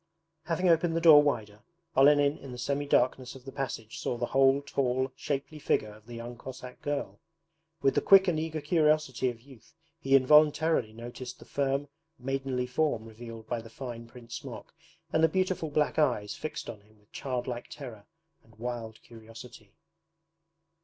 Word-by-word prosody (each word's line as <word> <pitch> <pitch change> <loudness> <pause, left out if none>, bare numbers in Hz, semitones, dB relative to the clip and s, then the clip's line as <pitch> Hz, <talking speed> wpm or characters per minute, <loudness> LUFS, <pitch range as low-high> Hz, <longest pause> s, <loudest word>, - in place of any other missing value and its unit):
Having 180 +2 0
opened 165 0 +3
the - - +2
door 155 -3 +9
wider, 110 -8 -1 0.4
Olenin 145 +1 +5
in 135 - -9
the 125 - -7
semi 140 +4 -2
darkness 130 -1 +1
of 130 -1 -13
the 135 - -7
passage 115 -5 -5
saw 120 - -2
the 120 - -1
whole 135 +2 +3
tall, 130 -2 0
shapely 145 +2 -4
figure 105 -6 0
of 110 +1 -18
the 120 - -8
young 120 +1 -7
Cossack 125 -1 -9
girl. 145 -1 -3 0.6
With 135 - +4
the - - +2
quick 195 -1 +7
and 165 -3 +1
eager 160 -1 -3
curiosity 155 -6 +2
of 115 -2 -8
youth 130 -3 -18 0.2
he 135 -3 +3
involuntarily 150 -1 +4
noticed 120 +2 -8
the - - -14
firm 140 0 -1 0.3
maidenly 135 -1 -2
form 125 -3 0
revealed 115 0 -10
by 120 -1 -2
the 115 - -12
fine 115 0 -7
print 120 -1 -14
smock, - - -8 0.4
and 160 - +3
the 160 - +6
beautiful 185 -2 0
black 150 +1 +1
eyes 105 -9 +1
fixed 155 - -6
on 105 -3 -8
him 110 +1 -25
with 105 0 -31
childlike 125 -2 -4
terror 120 -8 -9 0.4
and 115 -1 -22
wild 115 -1 -6
curiosity. 115 -2 -13
130 Hz, 170 wpm, -29 LUFS, 115-145 Hz, 0.6 s, door